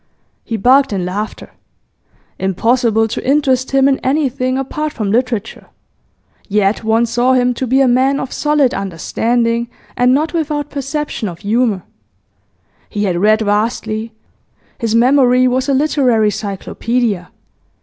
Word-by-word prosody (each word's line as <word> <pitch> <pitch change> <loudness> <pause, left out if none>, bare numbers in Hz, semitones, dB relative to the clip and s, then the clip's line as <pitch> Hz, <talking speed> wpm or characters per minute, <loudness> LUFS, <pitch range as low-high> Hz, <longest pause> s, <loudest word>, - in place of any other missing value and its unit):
He 225 - -4
barked 265 +5 +4
in 190 -3 -2
laughter. 205 +4 -5 0.9
Impossible 225 +4 +1
to 225 - -5
interest 265 -2 +1
him 270 0 +3
in 275 -1 +1
anything 260 -2 0
apart 300 +3 -3
from 210 -4 -2
literature; 230 -2 -2 0.8
yet 205 +1 +1
one 225 +2 +2
saw 240 +3 +1
him 250 -1 +2
to 255 +2 -3
be 265 +3 +3
a 270 - +4
man 260 +3 +2
of 260 - -5
solid 295 -4 +1
understanding, 230 +6 -1 0.3
and 245 0 +3
not 300 +6 +1
without 300 -3 -2
perception 280 -4 -3
of 170 -1 -10
humour. 215 -2 0 1.1
He 205 -1 -3
had 185 -4 0
read 215 +4 +3
vastly; 220 +1 -1 0.7
his 230 -2 -1
memory 255 +1 +4
was 260 +2 0
a - - +3
literary 255 -7 +2
cyclopaedia. 205 0 -2
245 Hz, 135 wpm, -16 LUFS, 215-265 Hz, 1.1 s, barked